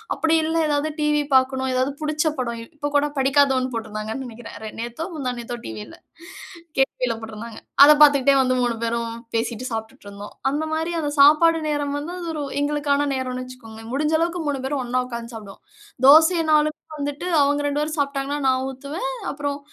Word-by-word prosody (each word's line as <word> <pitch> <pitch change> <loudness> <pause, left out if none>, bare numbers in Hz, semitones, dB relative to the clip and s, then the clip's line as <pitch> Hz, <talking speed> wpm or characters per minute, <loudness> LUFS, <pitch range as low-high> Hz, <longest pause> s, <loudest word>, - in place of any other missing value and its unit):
அப்படி 325 0 +2
இல்ல 320 +1 -1
எதாவது 295 +1 0
டிவி 300 0 +2
பாக்கணும், 260 0 +2
எதாவது 260 +2 0
புடிச்ச 305 0 0 0.2
படம் 235 -2 -3 0.2
இப்போ 290 0 -3
கூட 290 - +2
படிக்காதவன் 265 -1 +3
போட்ருந்தாங்கன்னு 220 +3 -5
நினைக்கிறேன். 230 0 -10
ரே 215 - -5
நேத்தோ 240 +7 -5
முந்தா 265 -5 -3
நேத்தோ 240 0 -5
டிவில, 110 0 -8 0.8
கேடிவில 250 -3 +1
போட்ருந்தாங்க. 220 +1 -8 0.3
அத 295 - +9
பாத்துகிட்டே 280 -2 +6
வந்து 255 0 +1
3 240 -1 0
பேரும் 230 0 -2 0.2
பேசிட்டு 230 +1 -2
சாப்ட்டுட்டிருந்தோம். 220 -2 -7 0.4
அந்த 295 +3 -1
மாரி 325 +2 -1
அந்த 295 -2 -1
சாப்பாடு 310 +3 +6
நேரம் 290 -1 -1
வந்து 300 +4 -5
அது 340 - -6
ஒரு 300 -2 -3 0.2
எங்களுக்கான 290 0 0
நேரம்னு 255 -1 -3
வச்சிக்கோங்களேன். 225 -3 -11
முடிஞ்சளவுக்கு 320 +4 0
3 280 -2 -1
பேரும் 275 -1 -1
ஒண்ணா 250 +1 0
உட்காந்து 235 -1 -7
சாப்பிடுவோம். 205 -3 -11 0.5
தோசைன்னாலும் 320 +1 +6 0.4
வந்துட்டு 290 +4 -4 0.2
அவுங்க 290 +1 +2
2 290 +1 -1
பேரும் 305 +1 -3
சாப்ட்டாங்கன்னா, 280 0 -1
நான் 260 0 +2
ஊத்துவேன். 290 - -5 0.2
அப்புறம் 285 0 -3
275 Hz, 160 wpm, -22 LUFS, 240-295 Hz, 0.8 s, அத